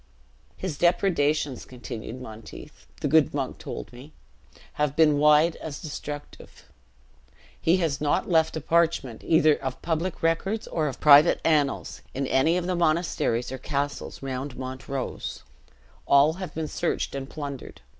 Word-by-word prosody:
"His 175 -7 -5
depredations," 155 -6 +1
continued 120 -1 -8
Monteith, 110 - -11
"the - - 0
good - - +3
monk - - -3
told - - -7
me, 135 +6 -12 0.7
have 150 -1 +1
been 150 -2 +4
wide 150 +2 +5
as 150 -2 -7
destructive. 145 -1 -8 1.0
He 170 +3 +3
has 160 -6 -1
not 145 -1 +1
left 160 -2 +2
a - - -4
parchment, 160 -7 +1
either 155 -1 +4
of 130 -2 -4
public 165 +1 -2
records 195 +7 0
or 155 -2 -1
of 135 - -5
private 150 +2 +7
annals, 150 -4 +1
in 135 +1 -1
any 145 +7 +2
of 180 - -2
the 180 0 -1
monasteries 155 -8 0
or 130 - -5
castles 145 0 -3
round 135 0 -4
Montrose; 130 0 -5 0.6
all 140 +3 +5
have 185 +1 -7
been 160 -1 -2
searched 170 - -2
and 135 0 -5
plundered. 140 -4 -7
150 Hz, 145 wpm, -26 LUFS, 135-165 Hz, 1.0 s, private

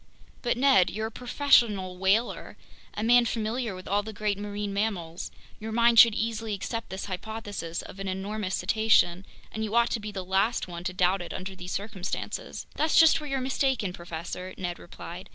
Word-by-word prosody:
"But 245 -1 0
Ned, 260 -9 +5
you're 220 +1 -3
a 220 - -4
professional 235 -7 +2
whaler, 195 +6 0 0.4
a 210 - -2
man 240 +1 +6
familiar 225 -1 -2
with 185 0 -10
all 200 +1 +2
the 220 +1 -7
great 210 -1 -1
marine 205 0 -4
mammals—your 200 +1 -4
mind 235 0 +5
should 230 -2 +8
easily 225 -1 -2
accept 230 +4 -4
this 190 - -5
hypothesis 205 -3 -5
of 195 - -11
an 195 - -4
enormous 190 +1 -2
cetacean, 210 -5 +2 0.2
and 220 - -3
you 215 +1 -3
ought 235 0 +4
to 230 - 0
be 210 0 -6
the 190 -2 -5
last 195 +5 +1
one 170 -1 -7
to 185 - -2
doubt 180 +1 +2
it 175 - -6
under 190 +1 -6
these 180 -1 -7
circumstances!" 200 -2 -4
"That's 310 +1 +3
just 325 -1 +6
where 300 - -6
you're 270 -1 -1
mistaken, 260 -6 0
professor," 175 +2 -7
Ned 175 -2 -4
replied. 175 +1 -9
205 Hz, 185 wpm, -27 LUFS, 185-230 Hz, 0.4 s, should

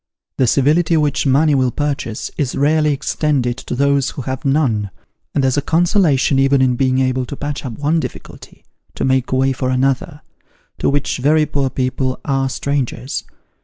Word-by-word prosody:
The 130 - +2
civility 155 +7 +3
which 145 -2 +1
money 145 +3 +3
will 130 -2 +2
purchase, 140 -5 -3
is 135 -4 -2
rarely 150 +2 +2
extended 140 -3 -1
to 130 - -5
those 140 0 +2
who 135 - -7
have 130 0 -4
none; 135 -8 +1 0.5
and 140 - +2
there's 130 +1 +1
a - - +2
consolation 165 -5 +2
even 135 0 +3
in 130 -1 +2
being 130 0 +1
able 130 0 +1
to 140 - -6
patch 145 +1 -5
up 130 -4 -5
one 150 +7 0
difficulty, - - -9 0.3
to - - -2
make 130 -1 +1
way 130 +1 +2
for 130 0 -2
another, 135 +3 0 0.6
to - - +1
which 145 -1 -1
very 150 +4 +3
poor 140 -2 -1
people 130 0 -2
are 135 -2 0
strangers. 135 -1 -3
135 Hz, 170 wpm, -18 LUFS, 130-145 Hz, 0.6 s, civility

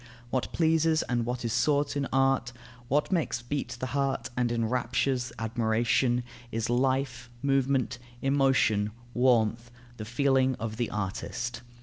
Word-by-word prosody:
What 130 - -1
pleases 160 -1 +2
and 120 -1 -1
what 125 0 -3
is 115 - -1
sought 145 +3 +2
in 140 -1 -1
art, 135 -2 +2 0.3
what 145 +7 +1
makes 160 -9 0
beat 140 +3 -3
the - - -2
heart 135 -2 -1
and 125 -1 +1
enraptures 125 +2 0
the 115 - -8
admiration, 115 +2 +1 0.3
is 115 +1 -1
life, 130 -1 0
movement, 135 -2 +1 0.2
emotion, 135 -7 +2 0.2
warmth, 120 -2 +2 0.3
the 110 - -6
feeling 130 +2 +2
of 110 -1 -5
the 120 -1 -1
artist. 105 +4 -4
125 Hz, 135 wpm, -28 LUFS, 115-135 Hz, 0.3 s, pleases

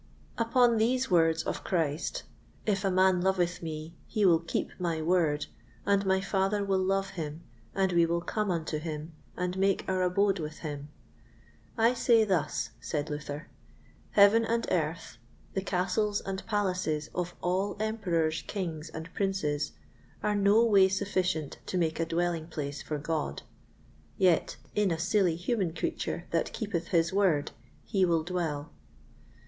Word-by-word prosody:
Upon 235 0 +4
these 250 +2 +1
words 165 -2 +4
of - - -3
Christ, 160 -3 -1 0.4
"If 200 -2 +1
a 195 - +2
man 185 -1 +4
loveth 180 -2 +1
me, 160 0 -6
he 215 -3 +1
will 170 -3 +6
keep 165 0 -3
my 170 -3 -1
Word, 160 -3 +2 0.4
and 200 -1 +2
my 190 0 +3
Father 195 +1 0
will 190 -1 +1
love 195 +1 0
him, 160 -1 -5 0.3
and 190 -1 +2
we 170 -1 +4
will 170 +1 0
come 210 +3 -2
unto 160 -3 -1
him, 155 0 -5 0.2
and 180 +1 -2
make 195 0 +2
our 185 -1 +1
abode 195 +2 +2
with 155 -1 -5
him," 145 -1 -5 0.9
I 230 +2 +4
say 235 -2 +4
thus, 175 - 0
said 150 0 -3
Luther: 150 +1 -5 0.7
Heaven 205 +3 +6
and 230 +1 0
earth, 165 -7 -1 0.4
the 195 - 0
castles 195 +3 0
and 190 0 -4
palaces 185 -8 -1
of 175 0 -3
all 190 +4 -1
Emperors, 175 -8 0
Kings, 165 -5 -4
and 160 +1 -7
Princes, 150 -7 -1 0.5
are 210 - +2
no 205 +3 +4
way 200 -4 +6
sufficient 185 -5 -1
to 185 - -1
make 160 -2 0
a 165 - 0
dwelling 170 -1 -1
place 145 -3 -4
for 150 - -3
God; 150 - -3 0.7
yet, 180 -3 +3 0.2
in 210 -2 +2
a 165 - 0
silly 175 0 +2
human 185 0 -1
creature 340 - -3
that - - 0
keepeth 190 -7 -3
his 170 0 +2
Word 185 -8 +2 0.3
he 195 -2 +1
will 165 -3 +3
dwell. 160 -4 -3
180 Hz, 155 wpm, -29 LUFS, 160-200 Hz, 0.9 s, will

